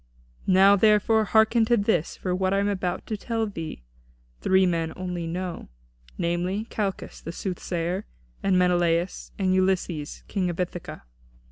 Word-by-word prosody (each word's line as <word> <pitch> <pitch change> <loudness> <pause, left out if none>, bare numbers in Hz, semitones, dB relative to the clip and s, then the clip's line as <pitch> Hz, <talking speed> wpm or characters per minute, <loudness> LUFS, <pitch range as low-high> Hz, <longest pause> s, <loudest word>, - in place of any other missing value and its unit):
Now, 195 +2 +6
therefore, 215 +2 +4
hearken 220 +4 +4
to 240 +1 +3
this, 200 -6 0
for 185 - -2
what 185 +1 +1
I - - +2
am 200 +1 +1
about 185 -3 -2
to 220 - -3
tell 225 +1 -2
thee 165 - -6 0.6
three 190 0 +4
men 165 -2 0
only 180 -2 -4
know, 180 +1 -4 0.5
namely, 180 +5 -1
Calchas, 200 -3 -3
the 165 - -6
soothsayer, 180 0 -3 0.4
and 190 -2 +2
Menelaus, 175 -1 +1
and 185 -2 +1
Ulysses, 185 -5 0
King 185 -3 -1
of 175 - -5
Ithaca. 175 -1 -4
185 Hz, 145 wpm, -25 LUFS, 175-200 Hz, 0.6 s, Now